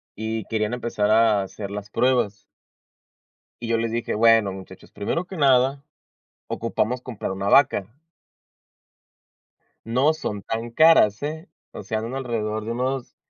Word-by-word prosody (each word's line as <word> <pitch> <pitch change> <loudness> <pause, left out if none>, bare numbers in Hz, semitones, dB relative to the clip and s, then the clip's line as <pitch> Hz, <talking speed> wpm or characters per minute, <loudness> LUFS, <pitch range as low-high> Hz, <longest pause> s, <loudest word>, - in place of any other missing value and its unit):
y 110 +1 -4
querían 110 0 -2
empezar 120 -4 -1
a 110 -2 +4
hacer 100 +1 -7
las 105 0 -6
pruebas. 120 -5 +1 1.2
Y 115 - -5
yo 115 - +1
les 115 0 -2
dije: 120 0 -2
"Bueno, 115 -2 +4
muchachos, 95 0 -12
primero 165 - -3
que 190 - -9
nada 135 -1 +3 0.7
ocupamos 115 +1 -2
comprar 120 -6 -5
una 100 +1 -2
vaca". 120 -8 +4 2.0
No 130 +7 +3
son 105 -10 -5
tan 115 +3 -4
caras, 115 -8 +5
¿eh? 155 +4 -5 0.2
O - - -8
sea, 110 +3 -2
un 115 +4 -5
alrededor 110 -5 -3
de 115 - -3
unos, 130 +2 -3
115 Hz, 140 wpm, -23 LUFS, 105-130 Hz, 2.0 s, caras